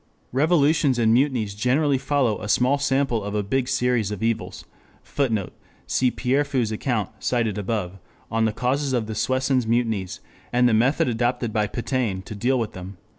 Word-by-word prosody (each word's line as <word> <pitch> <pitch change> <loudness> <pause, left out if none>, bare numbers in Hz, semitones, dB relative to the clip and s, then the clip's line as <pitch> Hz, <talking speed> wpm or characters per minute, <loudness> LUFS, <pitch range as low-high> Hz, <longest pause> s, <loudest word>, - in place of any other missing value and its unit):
Revolutions 145 -1 +3
and 115 -1 +3
mutinies 120 -5 +1
generally 135 +6 +1
follow 135 -5 0
a 105 - -5
small 130 +6 +3
sample 135 -5 +1
of 100 +1 -4
a 105 - 0
big 125 +5 -1
series 125 -5 +1
of 105 0 -5
evils. 115 -1 -2 0.4
[Footnote: 115 -9 -1 0.3
Cf. 130 -1 +1
Pierrefeu's 130 -3 0
account, 110 -2 -1
op. - - -24
cit., 115 -5 0 0.7
on 115 0 +1
the 110 - +1
causes 130 +5 -1
of 120 -3 0
the 110 - -5
Soissons 130 +1 0
mutinies, 110 -5 -1 0.3
and 125 0 +4
the 120 - +2
method 125 +7 +2
adopted 120 -1 -1
by 105 -2 +1
Pétain 115 -4 -2
to - - -7
deal 125 +6 +1
with 115 -3 -2
them. 95 +1 -9
120 Hz, 170 wpm, -23 LUFS, 110-135 Hz, 0.7 s, and